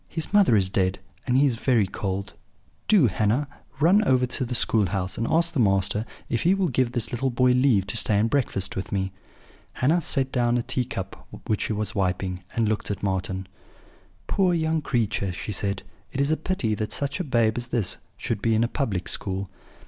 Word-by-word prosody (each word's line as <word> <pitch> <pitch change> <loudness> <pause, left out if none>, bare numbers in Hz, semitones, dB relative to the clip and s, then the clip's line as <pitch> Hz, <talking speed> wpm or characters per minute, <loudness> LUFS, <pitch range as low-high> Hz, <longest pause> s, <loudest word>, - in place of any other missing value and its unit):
His 160 +3 -3
mother 200 - +5
is 95 -3 +4
dead, 95 -1 0 0.3
and 125 0 +3
he 140 - +5
is 125 -5 +1
very 115 -4 +2
cold! 95 +1 -4 0.5
Do, 200 -10 +6
Hannah, 110 +7 +1 0.3
run 185 +8 +5
over 130 -8 +3
to 125 +1 -2
the 125 0 -3
school 110 -4 +2
house, 95 0 -2
and 115 - -2
ask 170 +1 +2
the 150 - -1
master 100 +1 +2 0.2
if 115 - -1
he 180 +3 +4
will 190 -3 +1
give 125 -2 0
this 120 -4 -1
little 130 +2 0
boy 125 +1 +3
leave 125 -6 +3
to 100 - -4
stay 105 0 +2
and 110 +2 +3
breakfast 115 -7 -1
with 95 - -4
me.' 95 -1 -1 0.6
"Hannah 160 +7 +2
set 135 -3 -1
down 120 -1 +2
a 120 - -1
tea 130 0 -1
cup 95 -5 -7 0.2
which 105 - 0
she - - -1
was 105 -1 -2
wiping, 90 -1 -1
and 115 -2 +2
looking 105 -1 -1
at - - -21
Marten: 95 -1 -2 0.8
"'Poor 185 -3 +2
young 160 -1 0
creature!' 110 -8 -1
she 95 - -5
said. 100 0 -2 0.3
'It 135 - -4
is 140 +2 +2
a - - +4
pity 155 - -1
that 105 +1 -3
such 140 +3 -2
a - - 0
babe 115 -7 +2
as 120 -1 -3
this 115 -7 0 0.2
should 110 -4 -3
be 115 0 +2
in 110 - +3
a - - +2
public 100 -10 -2
school. 95 0 -3
115 Hz, 210 wpm, -25 LUFS, 100-135 Hz, 0.8 s, Do